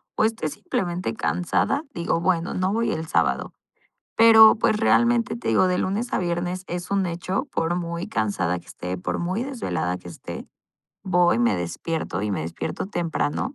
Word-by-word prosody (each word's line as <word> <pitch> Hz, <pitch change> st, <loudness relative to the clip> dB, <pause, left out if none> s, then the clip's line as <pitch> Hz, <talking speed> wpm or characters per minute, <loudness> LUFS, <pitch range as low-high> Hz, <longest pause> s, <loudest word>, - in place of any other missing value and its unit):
O -, -, +2 dB
esté 220 Hz, -7 st, 0 dB
simplemente 175 Hz, +4 st, -3 dB
cansada, 180 Hz, -, 0 dB
digo: 170 Hz, 0 st, -1 dB
"Bueno, 175 Hz, -1 st, +1 dB
no 185 Hz, +1 st, 0 dB
voy 230 Hz, +2 st, 0 dB
el 160 Hz, 0 st, -4 dB
sábado". 75 Hz, -, 0 dB, 0.6 s
Pero, 220 Hz, -1 st, +9 dB
pues, 215 Hz, -, +2 dB
realmente, 115 Hz, -, +3 dB
te 120 Hz, -, -5 dB
digo, 115 Hz, +11 st, +4 dB
de 180 Hz, 0 st, +1 dB
lunes 210 Hz, +6 st, -2 dB
a -, -, +2 dB
viernes 175 Hz, 0 st, -2 dB
es 175 Hz, +1 st, -5 dB
un 200 Hz, -1 st, +2 dB
hecho, 175 Hz, -, -2 dB
por 165 Hz, +1 st, 0 dB
muy 170 Hz, 0 st, -3 dB
cansada 100 Hz, -5 st, -1 dB
que -, -, -24 dB
esté, 90 Hz, +1 st, -5 dB
por 90 Hz, -, -3 dB
muy 185 Hz, +6 st, -1 dB
desvelada 90 Hz, -, -2 dB
que 90 Hz, -, -15 dB
esté, 85 Hz, -, -8 dB, 0.6 s
voy, 180 Hz, -, +3 dB
me 115 Hz, -4 st, +2 dB
despierto 90 Hz, -, -3 dB
y 105 Hz, -, -1 dB
me 95 Hz, -, -2 dB
despierto 80 Hz, -, -4 dB
temprano. 175 Hz, -, -2 dB
175 Hz, 175 wpm, -24 LUFS, 115-190 Hz, 0.6 s, Pero